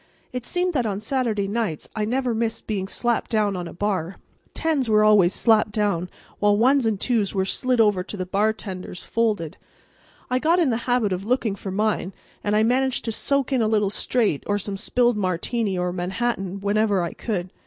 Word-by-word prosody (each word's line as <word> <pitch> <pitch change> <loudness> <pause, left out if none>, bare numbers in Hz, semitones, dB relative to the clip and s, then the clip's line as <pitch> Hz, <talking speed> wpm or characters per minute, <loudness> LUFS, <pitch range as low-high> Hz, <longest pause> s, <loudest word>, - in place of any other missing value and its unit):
It 250 -1 -4
seemed 360 0 0
that 250 -6 +1
on 200 -1 -2
Saturday 220 -3 -1
nights 205 -7 -2
I 215 -1 0
never 250 +2 0
missed 225 0 -2
being 195 -3 -2
slapped 240 +3 -1
down 210 -3 +1
on 175 -1 -4
a - - -8
bar. 190 -2 -2 0.4
Tens 300 -7 0
were 215 0 +5
always 205 -4 +5
slapped 215 -1 +3
down, 200 -5 0 0.3
while 205 0 +3
ones 255 +2 +4
and 210 -3 0
twos 220 -6 0
were 190 -1 +1
slid 255 +5 0
over 210 -4 +4
to 205 - -7
the 185 - -3
bartenders 195 -2 -2
folded. 210 -8 -1 0.7
I 255 +1 +1
got 330 +5 +3
in 325 -7 +3
the 225 - +1
habit 235 -6 +2
of 185 +1 -3
looking 235 -3 +1
for 195 - -7
mine, 200 -1 -1 0.3
and 205 0 +1
I 215 - +4
managed 260 +3 +1
to 225 - -1
soak 280 +4 0
in 255 - +2
a 220 - +2
little 210 -2 +1
straight 215 - 0
or 205 - +1
some 200 0 -4
spilled 240 +3 +1
Martini 195 +2 -1
or 180 0 -1
Manhattan 190 +1 -2
whenever 205 -2 +1
I 170 - -3
could. 185 -5 -3
215 Hz, 195 wpm, -23 LUFS, 195-240 Hz, 0.7 s, were